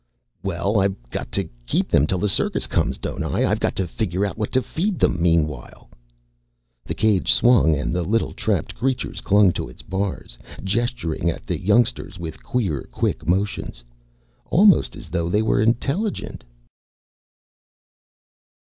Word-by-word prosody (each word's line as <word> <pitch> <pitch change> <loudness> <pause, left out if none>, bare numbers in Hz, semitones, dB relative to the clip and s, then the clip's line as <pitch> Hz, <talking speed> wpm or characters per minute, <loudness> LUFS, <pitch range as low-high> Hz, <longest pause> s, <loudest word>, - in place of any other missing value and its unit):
"Well, 95 +2 0
I've 95 0 +1 0.2
got - - -5
to 95 -3 0 0.2
keep - - 0
them 75 - +4
till 95 - 0
the 105 - 0
circus 95 - +1
comes, 65 - 0
don't - - -5
I? - - 0
I've - - +1
got - - 0
to 95 - -1
figure 95 +1 -1
out 100 - -3
what 105 -2 -3
to 130 - +2
feed 185 +3 -2
them 90 - +1
meanwhile." 75 -6 -1 0.9
The - - -4
cage 105 -4 +2
swung 120 -10 +5
and 75 +2 -2
the 90 - 0
little 110 +6 0
trapped - - -1
creatures 130 +1 -2
clung 100 -2 +5
to - - -4
its - - -14
bars, 95 -10 -4 0.2
gesturing 100 -5 -1
at 80 - -5
the - - -3
youngsters 115 0 +1
with 80 -3 -7
queer, 95 - -2
quick 75 - -2
motions 95 -9 -1 0.6
almost 195 +2 +4
as 110 -6 -10
though 85 -1 -1
they 105 +4 +2
were 110 - +2
intelligent. 140 - -1
100 Hz, 155 wpm, -22 LUFS, 85-115 Hz, 0.9 s, swung